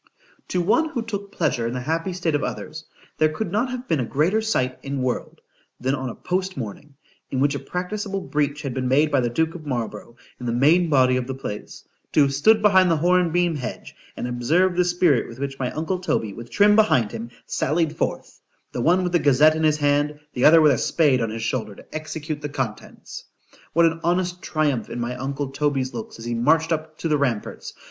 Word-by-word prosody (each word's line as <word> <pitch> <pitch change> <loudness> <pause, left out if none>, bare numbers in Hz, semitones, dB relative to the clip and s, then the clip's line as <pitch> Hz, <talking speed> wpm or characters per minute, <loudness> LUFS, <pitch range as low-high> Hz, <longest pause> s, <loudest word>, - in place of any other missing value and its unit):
To 180 - 0
one 315 - +2
who 245 -7 -3
took 200 -3 -5
pleasure 125 - 0
in 120 - -3
the - - -2
happy 165 +7 -2
state 175 -3 -1
of 145 - 0
others,—there 155 0 -3
could 170 +4 -4
not 225 +6 0
have 255 0 -6
been 160 - +1
a - - +1
greater 155 - +1
sight 130 -13 -1
in 140 -1 -3
world, 125 -1 -3 0.4
than 130 +2 0
on 130 -2 -3
a - - -7
post 185 0 -2
morning, 135 +5 -7 0.3
in 130 - -2
which 140 +2 +2
a 140 - -3
practicable 195 +2 -4
breach 150 -4 -1
had 135 -3 -3
been 130 0 -2
made 145 +4 +3
by 140 - +3
the 120 -1 0
duke 160 +6 0
of 160 -4 -10
Marlborough, 120 -3 -4 0.2
in 125 - -5
the 115 - 0
main 160 +8 +4
body 130 -3 +4
of 125 -1 -3
the 135 - -4
place,—to 120 +4 -6
have 140 -1 +4
stood 215 +10 +4
behind 190 -3 +5
the 165 - +3
horn 175 +1 +3
beam 175 0 +2
hedge, 130 -4 -6 0.2
and - - -3
observed 160 +10 +1
the 180 0 +3
spirit 175 -8 +2
with 115 - -11
which 135 0 -5
my 125 -2 -1
uncle 165 +4 -2
Toby, 110 - -1
with 115 +2 -10
Trim 210 0 +4
behind 130 - +3
him, 115 +1 -6 0.2
sallied 155 +1 0
forth;——the 120 - -5
one 180 +8 +3
with 180 - -1
the 175 - +3
Gazette 145 +2 +5
in 160 - -2
his 155 -1 +3
hand,—the 145 -2 -1
other 160 +1 +8
with 150 -1 +6
a - - +1
spade 145 -7 +2
on 115 - -1
his 110 +1 -5
shoulder 110 -3 -2
to - - -16
execute 155 -1 -5
the 145 - -4
contents.——What 135 +5 -4
an 165 0 +1
honest 180 +1 0
triumph 145 - -1
in - - -5
my 120 +1 -3
uncle 135 +2 -3
Toby's 140 -2 -1
looks 225 0 -7
as 115 - -9
he 120 - -2
marched 160 +8 +2
up 155 -1 -3
to - - -3
the 150 -2 +1
ramparts! 125 -7 -3
150 Hz, 215 wpm, -23 LUFS, 130-175 Hz, 0.4 s, other